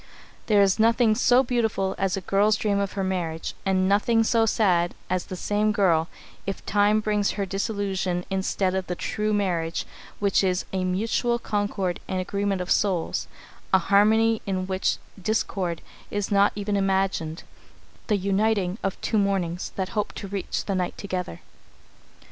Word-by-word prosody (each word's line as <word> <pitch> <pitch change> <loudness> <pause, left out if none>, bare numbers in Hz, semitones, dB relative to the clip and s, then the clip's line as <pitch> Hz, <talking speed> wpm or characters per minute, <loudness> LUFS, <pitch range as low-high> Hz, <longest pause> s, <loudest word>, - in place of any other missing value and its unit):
There 205 -2 +5
is 195 +2 +2
nothing 230 0 +4
so 250 +3 +4
beautiful 225 -6 0
as 195 -1 0
a - - -3
girl's 205 +3 +3
dream 200 -1 0
of 200 -1 -2
her 195 - -2
marriage, 175 -4 -2
and 185 -1 +2
nothing 225 +3 +3
so 225 0 +2
sad 180 -6 +2 0.2
as 185 -1 0
the 185 - -6
same 210 +3 0
girl, 170 -6 +2 0.4
if 195 - -4
Time 205 +1 +3
brings 210 -1 0
her 200 - -2
disillusion 195 -2 -2
instead 190 0 0
of 190 -1 -2
the 180 - -2
true 210 +4 -2
marriage 175 -5 -1 0.3
which 200 -1 +2
is 185 -1 0
"a 185 -1 0
mutual 225 +6 0
concord 205 -5 -2
and 185 - -2
agreement 200 0 -1
of 180 - -4
souls, 185 -5 +1 0.4
a 190 - +7
harmony 215 +4 +3
in 185 -1 -1
which 190 0 0 0.2
discord 185 -4 -1 0.3
is 205 -1 -3
not 200 0 +4
even 205 0 -2
imagined; 190 -4 0 0.6
the 210 - +2
uniting 200 0 0
of 195 - -3
two 220 - +1
mornings 190 -3 -1
that 190 -1 -2
hope 210 -2 -2
to 200 - -7
reach 195 -1 -3
the 200 - -1
night 180 -2 -2
together." 180 - -4
195 Hz, 160 wpm, -25 LUFS, 185-210 Hz, 0.6 s, a